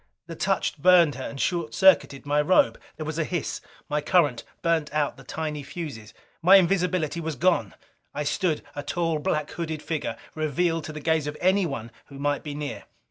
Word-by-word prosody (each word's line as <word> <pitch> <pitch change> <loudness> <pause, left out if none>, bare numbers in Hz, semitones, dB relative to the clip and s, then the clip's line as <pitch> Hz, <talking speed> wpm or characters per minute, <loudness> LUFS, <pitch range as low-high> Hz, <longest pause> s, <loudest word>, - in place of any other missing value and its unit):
The 165 -1 -8
touch 190 -3 0
burned 175 -2 +6
her, 130 +2 -6
and 140 - -7
short 170 0 -1
circuited 185 -8 +4
my 145 +1 +2
robe. 150 -8 +3 0.2
There 155 - -5
was 155 +1 -3
a - - +2
hiss. 175 0 -3 0.3
My 150 0 0
current 150 -6 +2 0.2
burned 165 -3 +1
out 150 -4 0
the 135 - -14
tiny 150 0 -4
fuses. 140 -7 -7 0.3
My 185 +4 +7
invisibility 180 -3 +2
was 160 -2 -3
gone! 170 - +1 0.4
I 150 - -3
stood, 150 +2 0
a 145 - -3
tall, 165 0 -1
blackhooded 155 +1 -2
figure, 160 -3 -3 0.2
revealed 160 +2 0
to - - -6
the 150 0 -7
gaze 160 -1 +1
of 150 0 -5
anyone 170 - +1 0.2
who 140 - -11
might 145 0 0
be 145 -2 -6
near! 145 -1 -5
155 Hz, 185 wpm, -26 LUFS, 145-170 Hz, 0.4 s, My